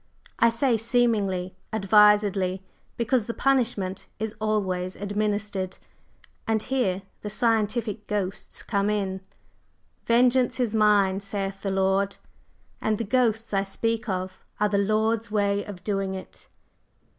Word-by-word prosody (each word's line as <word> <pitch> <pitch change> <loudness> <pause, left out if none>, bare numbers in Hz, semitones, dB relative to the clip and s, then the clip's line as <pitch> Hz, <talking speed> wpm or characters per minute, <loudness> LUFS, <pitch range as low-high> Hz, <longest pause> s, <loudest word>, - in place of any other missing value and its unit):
I 230 - +6
say 230 +1 +2
'seemingly' 215 -6 +1 0.2
advisedly, 205 -2 +4 0.3
because 235 -1 +1
the 230 - -4
punishment 235 -8 0
is 220 0 -3
always 190 -4 -1
administered. 205 -2 -2 0.7
And 220 -1 +1
here 215 -8 0 0.2
the 210 - -5
'scientific 220 -1 0
ghosts' 200 -2 -3
come 200 -1 0
in. 195 -3 -1 0.9
'Vengeance 245 +2 +3
is 240 -4 0
mine,' 205 -3 +4
saith 195 -1 -4
the 200 - -2
Lord, 195 +1 +1 0.6
and 215 -1 +1
the 230 - -2
ghosts 225 -1 +1
I 195 - +3
speak 225 +3 -2
of 185 0 -3 0.2
are 210 0 +2
the 200 -1 +1
Lord's 220 +2 +1
way 205 -1 +1
of 190 -3 -9
doing 195 -2 -1
it." 190 - -10
210 Hz, 125 wpm, -26 LUFS, 195-225 Hz, 0.9 s, I